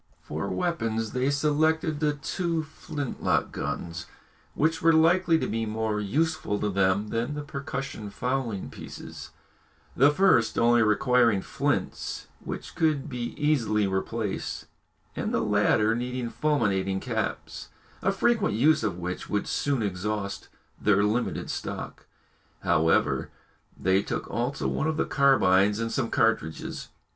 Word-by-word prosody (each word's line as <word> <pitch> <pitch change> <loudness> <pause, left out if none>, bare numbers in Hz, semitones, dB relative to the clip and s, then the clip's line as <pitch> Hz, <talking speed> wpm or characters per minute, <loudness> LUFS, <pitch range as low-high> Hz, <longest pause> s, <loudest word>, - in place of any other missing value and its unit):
For 80 +7 -4
weapons 115 -11 -1
they 130 +1 0
selected 155 +2 +1
the 150 -1 +2
two 165 +3 -2
flint 150 -3 -6
lock - - +1
guns, 85 +4 -4 0.5
which 160 +2 +1
were 165 0 +5
likely 165 +1 +4
to - - -1
be 115 0 -2
more 110 0 -1
useful 145 +1 0
to 105 - -1
them 100 +2 +1
than 120 +7 -2
the 150 - -4
percussion 140 -6 -5
fowling 125 -3 -2
pieces, - - -9 0.7
the 140 +3 +6
first 150 -8 +3
only 120 0 +5
requiring 115 -1 +3
flints - - -2
which - - -7
could 155 -3 +1
be 120 -3 -4
easily 115 -9 +2
replaced, 100 +2 -3 0.5
and - - -2
the - - +1
latter 110 +1 +3
needing 125 0 -3
fulminating 100 -11 +1
caps, - - -4 0.3
a 195 - +2
frequent 220 - +1
use 150 +8 +4
of 100 -5 -1
which 90 +1 -5
would 105 - 0
soon 140 -5 0
exhaust 100 +1 -3 0.3
their 100 -1 +4
limited 110 +4 0
stock. - - -6 0.5
However, 80 -1 +2 0.5
they 95 +1 +3
took - - -4
also 125 +5 -1
one 155 - -1
of 160 -1 -1
the - - +1
carbines 105 -8 +4
and 115 0 -2
some 115 - -1
cartridges. 115 - 0
120 Hz, 135 wpm, -27 LUFS, 105-150 Hz, 0.7 s, the